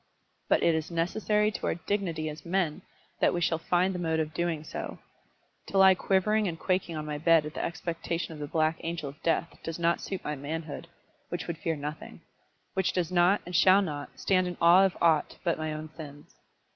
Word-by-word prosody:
But - - +3
it 170 - +4
is 160 -1 -2
necessary 210 +5 +1
to - - -4
our - - +1
dignity 170 -3 -2
as 150 0 -7
men 170 -3 -1 0.4
that - - +3
we - - 0
shall 165 -1 +1
find 180 +3 +1
the 180 - -4
mode 160 -2 0
of 155 0 -2
doing 170 -2 -1
so. - - -6 0.7
To 195 - -2
lie 190 0 +8
quivering 200 +3 +1
and 165 -2 -3
quaking 185 -3 -1
on 155 -1 -4
my 150 -1 -4
bed 165 -1 +4
at 150 - -6
the - - -3
expectation 165 0 -3
of 155 - -10
the 145 - -4
Black 155 +1 +1
Angel 165 -3 -4
of 140 - -14
Death, 170 0 -1
does 165 -1 -5
not 170 0 +1
suit 190 - -5
my 150 - -3
manhood, 155 +3 -5 0.4
which 175 - -4
would 170 -2 -5
fear 165 -4 -1
nothing; 150 +1 -7 0.5
which 190 -1 0
does 180 -2 -1
not, 180 +3 +4
and 180 - -6
shall 190 +4 +6
not, 145 -5 -5
stand 185 -1 +2
in 175 - -5
awe 175 +3 +7
of 190 - -1
aught 160 -3 +2
but 170 -3 0
my 155 0 -2
own 155 +1 -5
sins. 145 -2 -11
170 Hz, 210 wpm, -29 LUFS, 155-180 Hz, 0.7 s, lie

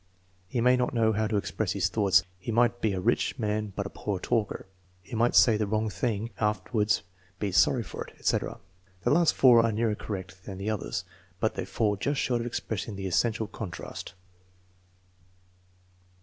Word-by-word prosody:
"He 115 +5 -1
may 125 +1 +5
not 125 0 0
know 110 -1 +3
how 110 +1 +1
to 105 -1 0
express 100 - -1
his - - +1
thoughts." 95 -3 +3 0.2
"He 95 - -4
might 120 +1 +2
be 110 -3 +1
a 95 - -2
rich 90 - +1
man 105 0 -1
but 100 - -2
a - - -4
poor 105 -2 -3
talker." 110 0 -1 0.4
"He 115 - -8
might 120 +2 +2
say 115 -4 +6
the 105 -1 -1
wrong 110 +1 0
thing 110 +3 -2
and - - -20
after 105 -3 -1
wards 105 -3 +2 0.3
be 100 0 -2
sorry 120 +6 +4
for - - -6
it," - - -16
etc. - - -1 0.4
(The - - +2
last 170 +1 +4
four 120 -3 +7
are 115 - +2
nearer 110 0 +1
correct 95 -3 -6
than 95 -2 -7
the 100 +3 -2
others, 105 - -3 0.3
but - - +1
they - - -4
fall 105 -2 0
just 140 +7 -1
short 120 -2 +1
of 120 - -3
expressing 110 -3 -4
the 95 0 -5
essential 110 +4 +1
contrast.) 100 -3 -7
110 Hz, 190 wpm, -28 LUFS, 100-115 Hz, 0.4 s, four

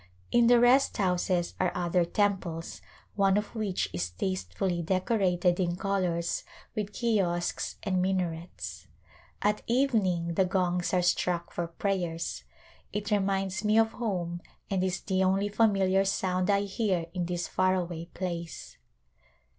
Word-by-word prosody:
In 240 -1 +5
the 240 0 +6
rest 250 +3 +4
houses 180 -2 +1
are - - +2
other 175 0 +1
temples, 185 -4 -1 0.3
one 195 -1 +3
of 210 0 -3
which 200 - -1
is 90 0 -2
tastefully 95 - -2
decorated 185 -1 +1
in 175 -2 +1
colors 180 -3 -1 0.3
with 210 -1 -2
kiosks 195 -7 0
and 185 -1 +1
min 190 +1 +1
arets. 170 -1 -5 0.6
At 210 0 +2
evening 210 -10 +1
the 190 +3 +3
gongs 180 -2 0
are 180 -1 +2
struck 175 -1 0
for 175 -1 -2
prayers. 170 -2 -2 0.5
It 210 +1 -3
reminds 195 -1 0
me 215 +1 +3
of 225 0 +4
home 175 -7 -3 0.3
and 190 -1 +1
is 185 -1 -1
the 190 -1 0
only 195 +2 +2
familiar 195 -3 +3
sound 185 -1 0
I 200 -1 +4
hear 195 -3 -1
in 180 -2 -2
this 175 0 -2
far 185 0 +2
away 170 -2 -3
place. 170 - -6
185 Hz, 140 wpm, -29 LUFS, 175-200 Hz, 0.6 s, the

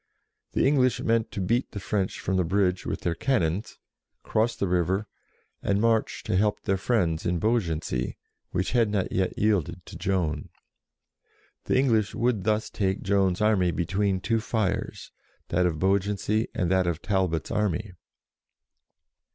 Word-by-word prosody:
The - - +2
English 130 -3 +3
meant 115 -1 +1
to - - -6
beat 115 +7 0
the 100 - -4
French 95 -1 -2
from 95 - -1
the 90 - +3
bridge 90 +1 +1
with - - -3
their 85 - 0
cannons, 100 - -1 0.5
cross 115 +2 +1
the 100 - -1
river, 90 +3 +1 0.6
and 100 0 +1
march 115 0 +1
to - - -1
help 105 +2 +1
their 95 - +1
friends 90 -6 0
in 90 0 0
Beaugency, 85 - -1 0.3
which 90 - -1
had 115 -3 +3
not 100 -3 -1
yet 95 -1 -1
yielded 105 -6 0
to - - -10
Joan. 85 -6 -1 1.2
The - - +2
English 115 -6 +2
would 120 -5 0
thus 110 0 0
take 95 -2 -1
Joan's 95 -1 +2
army 105 -4 +3
between 95 +3 0
two 115 +3 +1
fires, 110 -3 -2 0.4
that 90 +1 +2
of 80 -3 -2
Beaugency, 100 +4 +1
and 90 0 -1
that 95 -1 +3
of 85 -1 -2
Talbot's 95 -7 0
army. 105 -1 -1
100 Hz, 150 wpm, -26 LUFS, 90-110 Hz, 1.2 s, English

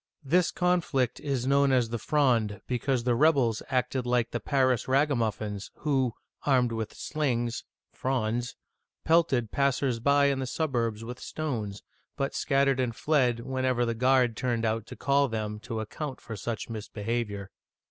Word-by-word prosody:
This 170 +6 +3
conflict 165 -9 +1
is 135 -4 -2
known 140 0 +4
as 125 -3 +2
the 120 0 -3
Fronde 120 -6 +2
(fr6Nd) 105 - -13
because 125 0 0
the 120 0 +2
rebels 125 -4 +3
acted 130 -1 0
like 120 -1 +1
the 120 - -2
Paris 130 -3 +1
ragamuffins, 115 -7 0
who, 135 -6 0 0.3
armed 125 -4 +3
with 110 -1 -4
slings 120 -6 -2 0.3
{frondes), 120 -2 -1 0.5
pelted 145 -9 +2
passers 135 -3 +1
by 140 +3 +4
in 140 -1 +2
the 130 - -2
suburbs 120 -7 -1
with 125 +2 -7
stones, 110 -10 -4 0.3
but 135 0 -1
scattered 135 -2 +2
and 120 -3 0
fled 125 -6 +2
whenever 130 -1 0
the 115 - 0
guard 125 0 +3
turned 120 -1 -1
out 110 0 -1
to - - -8
call 140 0 +2
them 105 -2 -3
to 115 0 -5
account 130 +5 -5
for 115 - -7
such 110 +1 -4
mis 110 -2 -6
behavior. 105 -2 -3
125 Hz, 160 wpm, -28 LUFS, 115-140 Hz, 0.5 s, known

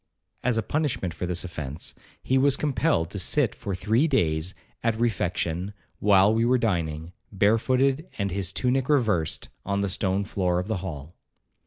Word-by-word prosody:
As 125 -2 +1
a 115 - +1
punishment 140 - -1
for 90 - -4
this 90 -1 -1
offence, 75 -4 -5 0.3
he 130 - +1
was 135 +1 +4
compelled 110 - +1
to 100 - -3
sit 125 +7 +2
for 100 -2 -4
three 110 - +2
days 85 - 0 0.3
at 115 -1 0
refection, 90 -3 -1 0.2
while 100 0 +5
we 115 +1 +2
were 125 +2 +4
dining, 85 -7 -1 0.2
barefooted 130 - +2
and 100 -2 -1
his 95 -1 -1
tunic 125 +5 0
reversed, 110 - +1
on 100 0 -1
the 100 - 0
stone 95 +1 0
floor 90 -3 0
of 90 +1 -2
the 110 - -1
hall. 85 -4 -7
100 Hz, 165 wpm, -26 LUFS, 90-120 Hz, 0.3 s, while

